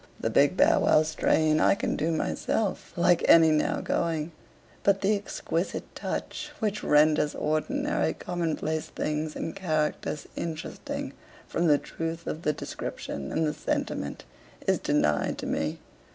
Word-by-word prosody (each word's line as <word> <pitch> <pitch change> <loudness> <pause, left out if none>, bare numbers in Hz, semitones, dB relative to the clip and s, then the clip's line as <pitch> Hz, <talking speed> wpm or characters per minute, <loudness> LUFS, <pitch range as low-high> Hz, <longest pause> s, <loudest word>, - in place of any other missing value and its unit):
The - - -1
big - - +4
Bow - - +5
Wow 155 - +5
strain 155 0 +2
I - - +5
can - - -1
do 160 +2 0
myself 190 +5 -1
like 175 0 +4
any 165 -1 +8
now 155 -1 +1
going; 165 -1 -1 0.5
but 195 -1 +3
the 205 +2 +3
exquisite 200 0 -3
touch 300 - -4
which 215 -5 -2
renders 150 0 +4
ordinary 275 - 0
common 175 -3 -2
place 155 0 -2
things 150 0 -3
and 165 - -4
characters 155 -5 -1
interesting 160 -1 -5 0.3
from 170 +1 0
the 150 -2 +6
truth 165 +3 -5
of 155 - -4
the 150 - +2
description 70 - -5
and 160 - +1
the 150 - 0
sentiment 70 - -3 0.4
is - - +2
denied 75 -1 +1
to - - -5
me. - - -1
160 Hz, 145 wpm, -27 LUFS, 150-175 Hz, 0.5 s, any